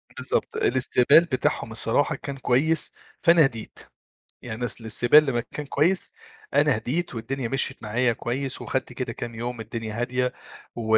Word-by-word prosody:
بالضبط، - - -2
الاستقبال 130 +5 +4
بتاحهم 130 -6 -1
الصراحة 115 +5 +1
كان 140 -1 -7
كويس، 145 +5 +2 0.3
فأنا 170 -3 +6
هديت. 115 -5 -5 0.6
يعني 120 +1 -4
أصل 120 - 0
الاستقبال 120 +7 +5
لمّا 120 -4 -1
كان 150 - -5
كويس، 160 +7 +1 0.4
أنا 145 -4 +3
هديت 135 +7 -3
والدنيا 120 +2 -3
مشيت 135 +1 -1
معايا 115 +3 +1
كويس 130 +4 -3
وخدت 130 -1 -3
كده 125 -2 -4
كام 115 0 -7
يوم 120 0 -5
الدنيا 110 -1 -6
هادية 125 +1 -1 0.4
و 110 -1 +2
125 Hz, 150 wpm, -24 LUFS, 115-140 Hz, 0.6 s, فأنا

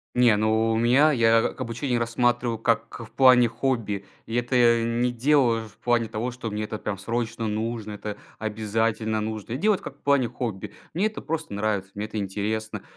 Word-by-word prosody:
Не, 125 -3 +5
ну, 110 +1 +2
у - - +1
меня, 130 +7 +4
я 115 -3 +4
обучение 120 +2 -2
рассматриваю 120 0 0
как 115 0 0
в - - -21
плане 125 -2 +6
хобби. 115 -4 -2 0.2
И 115 - -6
это 120 +1 0
я 115 -1 +5
не 120 +2 0
делаешь 120 -3 +2
в 105 - -26
плане 120 -2 +1
того, 115 +3 -3
что 120 -2 -6
мне 105 +1 -3
это, 105 0 -5
прям, 100 -2 -4
срочно 115 +2 -3
нужно, 110 0 -3
это 105 0 -6 0.2
обязательно 110 0 -1
нужно. 110 +1 -4
Делать, 205 +4 +2
как 140 - -9
в - - -38
плане 140 -4 +3
хобби. 115 -5 -5 0.2
Мне 190 +6 +1
это 215 - -4
просто 160 -8 -4
нравится, 100 -2 -2
мне 105 +1 -4
это 110 - -5
интересно. 105 +2 -3
115 Hz, 185 wpm, -25 LUFS, 110-125 Hz, 0.2 s, плане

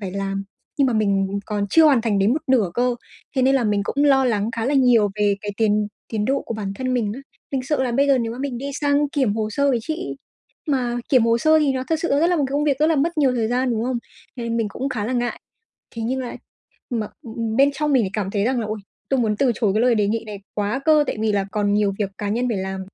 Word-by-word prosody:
phải 195 -3 -4
làm 195 0 -3 0.3
nhưng 275 - +4
mà 250 - +1
mình 200 -2 +1
còn 205 -1 -1
chưa 325 -1 +6
hoàn 280 -6 +5
thành 220 -3 0
đến 200 +4 +3
một 290 - +1
nửa 235 -9 +2
cơ. 245 0 +1 0.4
Thế 260 - +3
nên 270 +1 +4
là 260 -4 +2
mình 205 -1 +1
cũng 285 +6 0
lo 270 -2 +4
lắng 215 -3 0
khá 225 - -1
là 285 - +1
nhiều 245 -6 +4
về 205 -1 +2
cái 205 -1 -4
tiến 210 -1 +2 0.2
tiến 215 -2 -2
độ 270 +3 0
của 230 - -5
bản 200 -3 -4
thân 255 +3 -2
mình 215 -4 0
á. 270 - -8 0.3
Mình 260 -1 -1
sợ 280 +1 0
là 245 -2 -1
bây 280 +3 +3
giờ 275 -2 +4
nếu 230 -1 -2
mà 240 - -8
mình 265 -3 -3
đi 275 - -5
sang 290 0 +2
kiểm 260 -8 0
hồ 215 -1 -2
sơ 280 +4 +1
với 245 - +1
chị, 320 +6 -4 0.5
mà 245 -3 0
kiểm 255 -4 +4
hồ 230 0 +3
sơ 315 +5 +4
thì 290 -3 +2
nó 260 0 -3
thực 320 - +2
sự 340 - -1
nó 280 +2 +3
rất 335 - +4
là 355 0 +2
một 290 - +1
cái 270 - -7
công 295 +1 +1
việc 280 -3 +1
rất 310 - +3
là 320 -2 +2
mất 325 +3 0
nhiều 270 -3 +3
thời 225 -2 0
gian, 250 +1 0
đúng 225 0 -1
không? 250 -1 -1 0.4
Nên 235 -1 -3
mình 225 -2 0
cũng 265 +6 -4
khá 225 -6 -3
là 255 - -2
ngại, 240 -1 -2 0.5
thế 230 - -6
nhưng 260 +3 -1
là 250 - -5 0.5
mà 225 -4 -2 0.5
bên 275 +1 +6
trong 300 +1 -1
mình 250 - +4
lại 190 - -2
cảm 200 -2 -2
thấy 200 -1 0
rằng 255 -1 +1
là 220 - -2
"Ôi, 215 0 -4 0.3
tôi 270 - +2
muốn 220 -3 +1
từ 265 -3 +3
chối 210 -5 +1
cái 215 - +2
lời 245 -1 +4
đề 210 -2 +2
nghị 225 +2 -1
này 210 -2 -7 0.2
quá 210 +5 -1
cơ, 310 -2 +5
tại - - -2
vì 220 -1 +1
là 200 -1 0
còn 205 -1 0
nhiều 205 -1 +2
việc 200 -2 0
cá 205 -1 -3
nhân 240 +4 0
phải 220 - -1
làm." 190 0 -4
240 Hz, 290 wpm, -22 LUFS, 210-270 Hz, 0.5 s, chưa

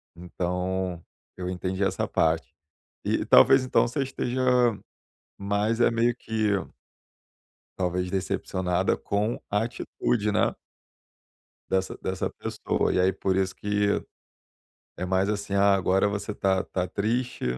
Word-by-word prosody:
Então, 90 0 -3 0.3
eu 90 0 -4
entendi 95 +1 -2
essa 95 - 0
parte. 80 0 0 0.5
E - - 0
talvez 135 -1 +7
então 125 - +2
você 135 +3 -1
esteja, 130 -1 -2 1.0
mais 100 +3 0
é - - +5
meio 115 +1 +2
que 110 -3 -1 1.3
talvez, 90 0 -1
decepcionada 95 -1 0
com 105 +3 -1
a 105 +2 +1
atitude, 110 -2 -1
né. 105 - +1 1.1
Dessa 95 0 0
dessa 95 0 -2
pessoa - - -2
e - - +1
aí 95 +1 +4
por 95 0 -1
isso 95 -1 0
que 105 0 0 1.0
é 90 - -3
mas, 95 +2 +1
assim, 100 -1 -3
ah, 100 0 +5
agora 95 +1 +2
você 100 +1 -3
tá 95 -1 +1
tá 90 -1 -2
triste 120 +8 -2
100 Hz, 125 wpm, -26 LUFS, 90-105 Hz, 1.3 s, talvez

